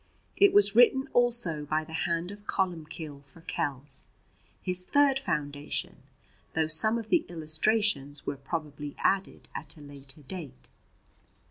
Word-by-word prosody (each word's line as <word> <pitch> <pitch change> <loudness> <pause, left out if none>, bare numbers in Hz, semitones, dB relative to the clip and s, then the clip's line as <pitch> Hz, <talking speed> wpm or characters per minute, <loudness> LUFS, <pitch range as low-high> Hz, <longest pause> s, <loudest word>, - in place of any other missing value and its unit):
It 400 0 +6
was 205 0 +5
written 265 +3 +6
also 235 -11 +2
by 155 +2 0
the 160 +1 -11
hand 170 +2 -1
of 205 0 -9
Columbcille 160 -5 -3
for 145 +4 -14
Kells, 135 -3 0 0.5
his 180 0 0
third 280 +4 +3
foundation, 145 - -2 0.6
though 160 0 +3
some 160 +9 +4
of 225 -2 -6
the 345 - +4
illustrations 155 -2 0
were 145 - -2
probably 145 0 -5
added 195 0 0
at - - -6
a - - -13
later 140 0 -9
date. 145 -4 -9
165 Hz, 135 wpm, -29 LUFS, 145-205 Hz, 0.6 s, It